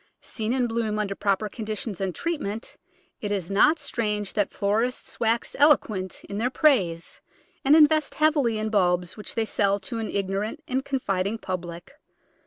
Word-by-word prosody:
Seen 220 Hz, -1 st, -4 dB
in 255 Hz, -1 st, +2 dB
bloom 225 Hz, -2 st, -1 dB
under 205 Hz, -2 st, -1 dB
proper 200 Hz, +1 st, 0 dB
conditions 215 Hz, -1 st, -5 dB
and 190 Hz, -2 st, -2 dB
treat 335 Hz, -2 st, -2 dB
ment 210 Hz, +3 st, -5 dB, 0.4 s
it 205 Hz, -, -4 dB
is 195 Hz, -3 st, -2 dB
not 300 Hz, +11 st, +5 dB
strange 210 Hz, -8 st, -2 dB
that 205 Hz, -3 st, +1 dB
florists 220 Hz, +5 st, -1 dB
wax 230 Hz, +1 st, 0 dB
eloquent 215 Hz, -, +2 dB
in 200 Hz, -, -5 dB
their 245 Hz, +3 st, +1 dB
praise, 200 Hz, -, +1 dB, 0.4 s
and 280 Hz, +3 st, +6 dB
invest 310 Hz, 0 st, +4 dB
heavily 295 Hz, -7 st, +2 dB
in 215 Hz, 0 st, -2 dB
bulbs 180 Hz, -3 st, +1 dB
which 210 Hz, -, -8 dB
they 225 Hz, -1 st, +1 dB
sell 200 Hz, -2 st, +1 dB
to 225 Hz, +4 st, -5 dB
an 220 Hz, -, -3 dB
ignorant 200 Hz, +9 st, -2 dB
and 260 Hz, +1 st, -1 dB
confiding 205 Hz, -7 st, -1 dB
public. 175 Hz, -1 st, -6 dB
215 Hz, 165 wpm, -25 LUFS, 195-250 Hz, 0.4 s, and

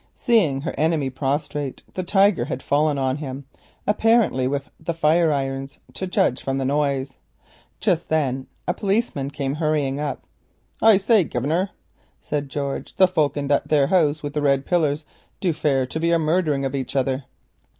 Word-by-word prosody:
Seeing 190 Hz, -, +2 dB
her 165 Hz, -, -3 dB
enemy 155 Hz, -4 st, +1 dB
prostrate 140 Hz, +1 st, -3 dB
the 185 Hz, -, -2 dB
Tiger 195 Hz, -5 st, +3 dB
had 130 Hz, -, -5 dB
fallen 145 Hz, 0 st, +2 dB
on 130 Hz, 0 st, 0 dB
him, 140 Hz, -2 st, -6 dB, 0.4 s
with 200 Hz, -, +2 dB
the 170 Hz, -, -3 dB
fire 160 Hz, +1 st, +3 dB
irons 135 Hz, 0 st, -3 dB, 0.2 s
to 190 Hz, -, -4 dB
judge 155 Hz, -8 st, +1 dB
from 135 Hz, 0 st, -2 dB
the 135 Hz, -, -1 dB
noise. 140 Hz, -2 st, 0 dB, 0.6 s
Just 180 Hz, -5 st, 0 dB
then 135 Hz, -4 st, 0 dB, 0.2 s
a 175 Hz, -, +2 dB
policeman 195 Hz, -, -1 dB
hurried 145 Hz, 0 st, -1 dB
up. 150 Hz, -2 st, -3 dB, 0.6 s
"I 220 Hz, -2 st, +7 dB
say, 205 Hz, 0 st, +4 dB
master," 160 Hz, +10 st, 0 dB, 0.5 s
said 145 Hz, -2 st, -3 dB
George, 140 Hz, 0 st, -4 dB
"the 185 Hz, -, +6 dB
folk 155 Hz, -6 st, 0 dB
in 140 Hz, -1 st, -2 dB
that 145 Hz, -, +2 dB
there 145 Hz, -3 st, +3 dB
house 155 Hz, -2 st, +2 dB
with 145 Hz, 0 st, -4 dB
the 150 Hz, -, -1 dB
red 140 Hz, -1 st, +2 dB
pillars 155 Hz, -4 st, +1 dB, 0.3 s
do 180 Hz, -4 st, +1 dB
fare 135 Hz, -4 st, +1 dB
to 145 Hz, +5 st, -5 dB
be 165 Hz, +1 st, +1 dB
a 170 Hz, -, +4 dB
murdering 155 Hz, -3 st, +1 dB
of 135 Hz, -, -2 dB
each 130 Hz, -2 st, -4 dB
other." 135 Hz, 0 st, 0 dB
145 Hz, 165 wpm, -23 LUFS, 135-170 Hz, 0.6 s, I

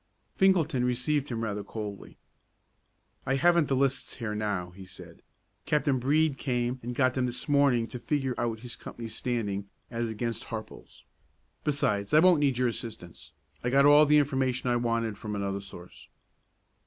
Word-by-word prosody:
Finkelton 165 Hz, -9 st, +3 dB
received 130 Hz, +4 st, 0 dB
him 115 Hz, -2 st, -3 dB
rather 105 Hz, -2 st, -3 dB
coldly. 105 Hz, -1 st, -7 dB, 1.1 s
"I 135 Hz, -, 0 dB
haven't 170 Hz, +2 st, +4 dB
the 135 Hz, -, +1 dB
lists 135 Hz, 0 st, 0 dB
here 115 Hz, -4 st, -4 dB
now," 105 Hz, -4 st, -2 dB
he 95 Hz, +2 st, -12 dB
said. 95 Hz, -, -13 dB, 0.5 s
"Captain 145 Hz, -3 st, +2 dB
Brede 145 Hz, +2 st, +2 dB
came 125 Hz, -1 st, -1 dB
and 120 Hz, +1 st, -5 dB
got 130 Hz, -1 st, +2 dB
them 130 Hz, -1 st, 0 dB
this 120 Hz, -, -4 dB
morning 140 Hz, -5 st, +3 dB
to 125 Hz, -, -7 dB
figure 135 Hz, -1 st, -1 dB
out 115 Hz, -2 st, -2 dB
his 120 Hz, -1 st, -5 dB
company's 115 Hz, -2 st, -8 dB
standing 105 Hz, -5 st, -3 dB, 0.2 s
as 115 Hz, -1 st, -2 dB
against 115 Hz, +1 st, -3 dB
Harple's. 110 Hz, -1 st, -9 dB, 0.6 s
Besides, 105 Hz, -5 st, 0 dB
I -, -, +8 dB
won't 175 Hz, -1 st, +5 dB
need 140 Hz, -4 st, +2 dB
your 125 Hz, 0 st, +2 dB
assistance; 115 Hz, -7 st, -8 dB, 0.3 s
I 120 Hz, -, 0 dB
got 140 Hz, +2 st, +4 dB
all 145 Hz, +1 st, +7 dB
the 150 Hz, +1 st, +5 dB
information 130 Hz, -3 st, +1 dB
I -, -, +2 dB
wanted 115 Hz, -3 st, -1 dB
from 105 Hz, -1 st, -5 dB
another 100 Hz, -1 st, -2 dB
source." 90 Hz, -3 st, -12 dB
125 Hz, 165 wpm, -28 LUFS, 110-140 Hz, 1.1 s, I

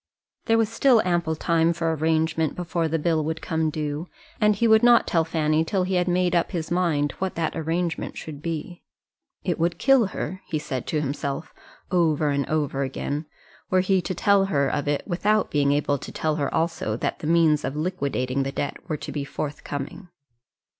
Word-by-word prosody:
There 225 Hz, -, +3 dB
was 225 Hz, -1 st, +3 dB
still 235 Hz, +1 st, +4 dB
ample 175 Hz, -3 st, 0 dB
time 165 Hz, +1 st, +2 dB
for 165 Hz, -1 st, -1 dB
arrangement 160 Hz, 0 st, +1 dB
before 170 Hz, -1 st, -1 dB
the 160 Hz, +1 st, 0 dB
bill 160 Hz, 0 st, +1 dB
would 160 Hz, +1 st, -2 dB
come 160 Hz, -1 st, -1 dB
due, 150 Hz, +2 st, -3 dB, 0.3 s
and 210 Hz, -1 st, +4 dB
he 230 Hz, +4 st, +2 dB
would 220 Hz, -1 st, +6 dB
not 240 Hz, -1 st, +6 dB
tell 165 Hz, -2 st, +2 dB
Fanny 160 Hz, -1 st, +1 dB
till 185 Hz, +3 st, 0 dB
he 185 Hz, +1 st, -2 dB
had 180 Hz, 0 st, +2 dB
made 180 Hz, 0 st, +2 dB
up 170 Hz, -, +2 dB
his 165 Hz, -2 st, -3 dB
mind 165 Hz, -5 st, +1 dB
what 190 Hz, 0 st, -2 dB
that 165 Hz, -1 st, -1 dB
arrangement 165 Hz, +1 st, -2 dB
would 145 Hz, -2 st, -8 dB
be. 165 Hz, +2 st, -5 dB, 0.6 s
It 175 Hz, -3 st, -1 dB
would 170 Hz, +1 st, +1 dB
kill 260 Hz, -4 st, +4 dB
her, 185 Hz, 0 st, -5 dB
he 155 Hz, -, -1 dB
said 130 Hz, -4 st, -4 dB
to 155 Hz, -, 0 dB
himself 140 Hz, +2 st, -3 dB, 0.4 s
over 160 Hz, -4 st, +2 dB
and 140 Hz, -1 st, 0 dB
over 145 Hz, -3 st, 0 dB
again, 140 Hz, +3 st, -3 dB, 0.4 s
were 185 Hz, 0 st, +3 dB
he 190 Hz, 0 st, +2 dB
to 185 Hz, -, -4 dB
tell 200 Hz, +1 st, +4 dB
her 140 Hz, -7 st, +1 dB
of 145 Hz, -1 st, -2 dB
it 145 Hz, -1 st, 0 dB
without 210 Hz, +3 st, +1 dB
being 140 Hz, -1 st, +2 dB
able 145 Hz, -1 st, +1 dB
to -, -, -8 dB
tell 155 Hz, -1 st, -1 dB
her 140 Hz, -2 st, -1 dB
also 160 Hz, -10 st, -1 dB
that -, -, -2 dB
the 150 Hz, -, -5 dB
means 160 Hz, -2 st, +4 dB
of 135 Hz, -, -3 dB
liquidating 140 Hz, -6 st, -1 dB
the 135 Hz, 0 st, -2 dB
debt 140 Hz, -, -3 dB
were 155 Hz, -, -1 dB
to -, -, -7 dB
be 145 Hz, -, -3 dB
forthcoming. 145 Hz, +4 st, -5 dB
160 Hz, 195 wpm, -24 LUFS, 150-180 Hz, 0.6 s, would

